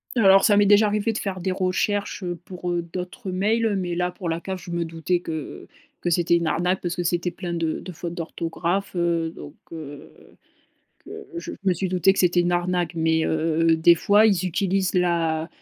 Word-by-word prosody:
Alors, 195 Hz, -4 st, +6 dB
ça 205 Hz, -, +5 dB
m'est 205 Hz, 0 st, +5 dB
déjà 205 Hz, +2 st, +6 dB
arrivée 210 Hz, +2 st, 0 dB
de 215 Hz, -, -4 dB
faire 195 Hz, -3 st, -3 dB
des 190 Hz, +1 st, -1 dB
recherches, 195 Hz, +2 st, -1 dB
heu, 175 Hz, -1 st, -3 dB
pour, 180 Hz, -1 st, -6 dB
heu, 175 Hz, -1 st, -1 dB
d'autres 185 Hz, +3 st, -5 dB
mails, 215 Hz, +3 st, +1 dB
mais 180 Hz, -3 st, -2 dB
là 180 Hz, +1 st, -1 dB
pour 175 Hz, -2 st, -5 dB
la 165 Hz, 0 st, -1 dB
CAF, 190 Hz, +1 st, -6 dB
je 175 Hz, -, -9 dB
me 170 Hz, -1 st, -1 dB
doutais 165 Hz, +2 st, -1 dB
que 160 Hz, -4 st, -6 dB, 0.3 s
que 175 Hz, -, -1 dB
c'était 170 Hz, 0 st, +2 dB
une 170 Hz, -1 st, 0 dB
arnaque 180 Hz, +3 st, 0 dB
parce 175 Hz, -1 st, -3 dB
que 175 Hz, -, -1 dB
c'était 175 Hz, +1 st, 0 dB
plein 175 Hz, -2 st, -6 dB
de 165 Hz, -2 st, -1 dB
de 185 Hz, -, -8 dB
fautes 170 Hz, 0 st, -6 dB
d'orthographe, 170 Hz, +3 st, -3 dB
heu, 170 Hz, -2 st, 0 dB
donc, 145 Hz, +2 st, -10 dB, 0.2 s
heu, 145 Hz, -3 st, -9 dB, 0.9 s
que -, -, -9 dB
je 340 Hz, 0 st, -5 dB
je 195 Hz, -, -3 dB
me 185 Hz, -, +4 dB
suis 185 Hz, +2 st, -2 dB
doutée 185 Hz, +1 st, +3 dB
que -, -, -5 dB
c'était 175 Hz, -1 st, +3 dB
une 175 Hz, 0 st, +1 dB
arnaque, 175 Hz, -1 st, 0 dB
mais, 160 Hz, 0 st, +2 dB
heu, 165 Hz, +1 st, +2 dB
des 165 Hz, +2 st, +6 dB
fois, 205 Hz, +6 st, +4 dB
ils 190 Hz, -4 st, +2 dB
utilisent 190 Hz, +1 st, 0 dB
l'a 170 Hz, -2 st, +1 dB
175 Hz, 210 wpm, -23 LUFS, 165-190 Hz, 0.9 s, Alors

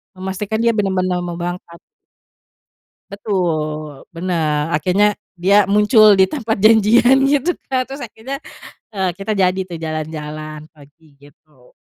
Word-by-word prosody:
memastikan 190 Hz, +3 st, -4 dB
dia 235 Hz, -, +4 dB
benar-benar 185 Hz, -3 st, 0 dB
mau 175 Hz, -1 st, -5 dB
berangkat. 175 Hz, -1 st, -6 dB, 1.3 s
Betul, 155 Hz, -7 st, -3 dB
benar, 165 Hz, -3 st, -2 dB
akhirnya 185 Hz, +7 st, +2 dB, 0.2 s
dia 195 Hz, +2 st, +3 dB
muncul 210 Hz, 0 st, +5 dB
di 190 Hz, -, +6 dB
tempat 230 Hz, -4 st, -3 dB
janjian, 220 Hz, +4 st, +5 dB
gitu 290 Hz, +5 st, +1 dB, 0.2 s
kan, 255 Hz, -1 st, 0 dB
terus 275 Hz, +2 st, -9 dB
akhirnya, 245 Hz, +5 st, -7 dB, 0.5 s
eee, 190 Hz, -3 st, -1 dB
kita 195 Hz, +3 st, -3 dB
jadi 190 Hz, -2 st, +1 dB
tuh 175 Hz, -3 st, -8 dB
jalan-jalan, 155 Hz, -1 st, -6 dB
pagi, 145 Hz, +1 st, -21 dB
gitu. 145 Hz, -1 st, -23 dB
185 Hz, 120 wpm, -18 LUFS, 155-210 Hz, 1.3 s, di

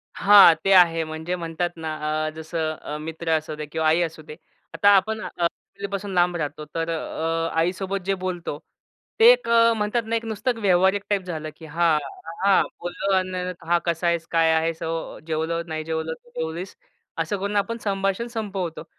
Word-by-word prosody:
हां, 200 Hz, -4 st, +8 dB
ते 195 Hz, -, +2 dB
आहे 165 Hz, -3 st, +6 dB
म्हणजे 160 Hz, +3 st, -4 dB
म्हणतात 170 Hz, 0 st, -2 dB
ना 160 Hz, -1 st, -4 dB, 0.4 s
अ, -, -, -1 dB
जसं 160 Hz, 0 st, -3 dB
अ, 150 Hz, -1 st, -7 dB
मित्र 160 Hz, +2 st, -6 dB
असू 155 Hz, 0 st, -6 dB
दे 150 Hz, 0 st, -5 dB
किंवा 160 Hz, +1 st, -1 dB
आई 165 Hz, +3 st, +4 dB
असू 160 Hz, -2 st, -3 dB
दे, 150 Hz, 0 st, -10 dB, 0.4 s
आता 205 Hz, -, +4 dB
आपण 215 Hz, +3 st, +1 dB
अ, -, -, -4 dB, 0.2 s
आई 200 Hz, +3 st, -4 dB
पासून 200 Hz, 0 st, -4 dB
लांब 175 Hz, 0 st, +2 dB
राहतो 150 Hz, 0 st, -4 dB
तर 165 Hz, 0 st, -1 dB
अ, 165 Hz, 0 st, -2 dB
आईसोबत 190 Hz, +3 st, -1 dB
जे 195 Hz, -, +1 dB
बोलतो 175 Hz, -5 st, -3 dB, 0.6 s
ते 460 Hz, +2 st, +9 dB
एक -, -, +1 dB
अ, 230 Hz, 0 st, +5 dB
म्हणतात 215 Hz, +3 st, 0 dB
ना 230 Hz, +1 st, -1 dB
एक 230 Hz, -, -2 dB
नुसतं 225 Hz, +2 st, -2 dB
व्यावहारिक 190 Hz, +1 st, +3 dB
टाइप 200 Hz, -2 st, +1 dB
झालं, 155 Hz, -3 st, -5 dB
की 160 Hz, -, -12 dB
हां, 165 Hz, 0 st, +2 dB, 0.3 s
हां, 165 Hz, -, -7 dB
हां, 200 Hz, -, +5 dB, 0.2 s
बोललो 190 Hz, +3 st, -2 dB
अन् 185 Hz, -1 st, -2 dB
हा 175 Hz, -, +4 dB
कसा 170 Hz, 0 st, 0 dB
आहेस? 170 Hz, -1 st, 0 dB
काय 165 Hz, -1 st, +4 dB
आहेस? 160 Hz, 0 st, 0 dB
हो 165 Hz, 0 st, -4 dB
जेवलो 160 Hz, +1 st, -1 dB
नाही 155 Hz, -1 st, -4 dB
जेवलो 160 Hz, 0 st, -3 dB
तू 240 Hz, -, -17 dB
जेवलीस? 165 Hz, +4 st, -4 dB, 0.4 s
असं 165 Hz, +5 st, -1 dB
करून 200 Hz, +2 st, -3 dB
आपण 205 Hz, +3 st, 0 dB
संभाषण 195 Hz, +2 st, -1 dB
संपवतो. 200 Hz, -9 st, -4 dB
175 Hz, 190 wpm, -24 LUFS, 160-195 Hz, 0.6 s, ते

